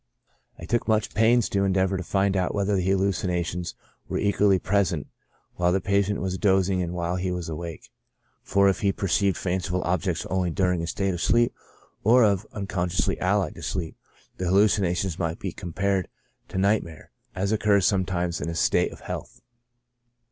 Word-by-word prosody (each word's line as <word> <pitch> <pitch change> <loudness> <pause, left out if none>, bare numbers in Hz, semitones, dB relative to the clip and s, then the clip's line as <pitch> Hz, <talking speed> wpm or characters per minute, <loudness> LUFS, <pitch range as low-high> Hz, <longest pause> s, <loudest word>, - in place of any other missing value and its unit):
I 80 - -9
took 120 +6 -1
much 110 -1 +1
pains 115 +2 +4
to 100 -1 +1
endeavor 95 0 +1
to 95 - -2
find 95 +2 0
out 90 +1 0
whether 100 0 +1
the 95 - +1
hallucina 95 -2 +1
tions 90 +1 -5 0.3
were - - -2
equally 100 -1 +3
present 95 -6 0 0.5
while 90 0 +2
the 95 - +2
patient 100 +1 +1
was 95 0 -2
dozing 95 -2 +2
and 90 0 -3
while 85 +1 -1
he 90 +1 -2
was 90 -2 -4
awake; 80 +1 -7 0.5
for 100 0 +3
if 95 - +2
he 100 - +3
perceived 95 -1 +1
fanciful 90 0 -1
objects 90 -1 -1
only 95 -1 0
during 90 0 +1
a 85 - -3
state 95 +2 -1
of 85 - -4
sleep, 120 0 +3 0.5
or 120 +4 +6
of 100 -1 +2
unconsciousness 95 -3 -1
allied 95 -2 +1
to - - -11
sleep, 85 -4 -3 0.4
the 90 - -2
hallucinations 95 -2 +2
might 85 -2 -1
be - - -4
compared 95 +2 -2 0.4
to - - -6
nightmare, 95 -5 0 0.2
as 100 +3 0
oc 110 - +1
curs 100 -3 +3
sometimes 90 -3 0
in - - -3
the 85 - -3
state - - +2
of - - -12
health. - - -7
95 Hz, 175 wpm, -25 LUFS, 90-100 Hz, 0.5 s, or